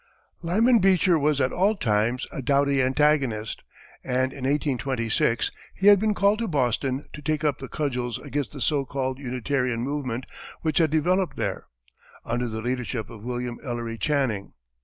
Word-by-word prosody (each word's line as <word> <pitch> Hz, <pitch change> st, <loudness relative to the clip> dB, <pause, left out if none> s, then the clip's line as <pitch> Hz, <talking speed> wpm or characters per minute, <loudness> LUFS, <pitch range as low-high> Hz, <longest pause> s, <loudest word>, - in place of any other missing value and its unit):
Lyman 225 Hz, +8 st, +4 dB
Beecher 185 Hz, -3 st, +4 dB
was 150 Hz, 0 st, +2 dB
at 130 Hz, -1 st, +2 dB
all 200 Hz, +5 st, +2 dB
times 115 Hz, -, 0 dB
a -, -, -5 dB
doughty 140 Hz, 0 st, +2 dB
antagonist, 130 Hz, -5 st, +1 dB, 0.4 s
and 130 Hz, +1 st, 0 dB
in 135 Hz, -2 st, -6 dB
1826 130 Hz, -5 st, 0 dB, 0.2 s
he 190 Hz, -, -3 dB
had 205 Hz, -1 st, +7 dB
been 215 Hz, 0 st, +1 dB
called 200 Hz, +2 st, +3 dB
to 230 Hz, -, -1 dB
Boston 130 Hz, -, 0 dB
to 150 Hz, -, -8 dB
take 155 Hz, +1 st, -1 dB
up 145 Hz, -3 st, +1 dB
the 135 Hz, -, -6 dB
cudgels 125 Hz, -5 st, -2 dB
against 145 Hz, -2 st, -3 dB
the 140 Hz, -, -8 dB
so 145 Hz, +2 st, +2 dB
called 130 Hz, -1 st, -3 dB
Unitarian 125 Hz, -2 st, -1 dB
movement 130 Hz, -2 st, -3 dB, 0.4 s
which 155 Hz, -1 st, +1 dB
had 160 Hz, -2 st, +4 dB
developed 175 Hz, +5 st, +1 dB
there, -, -, -3 dB, 0.6 s
under 120 Hz, +1 st, -1 dB
the 110 Hz, -1 st, -5 dB
leadership 125 Hz, -2 st, -3 dB
of 110 Hz, -3 st, -11 dB
William 120 Hz, 0 st, -4 dB
Ellery 120 Hz, -3 st, -4 dB
Channing. 130 Hz, -9 st, 0 dB
135 Hz, 160 wpm, -25 LUFS, 120-150 Hz, 0.6 s, had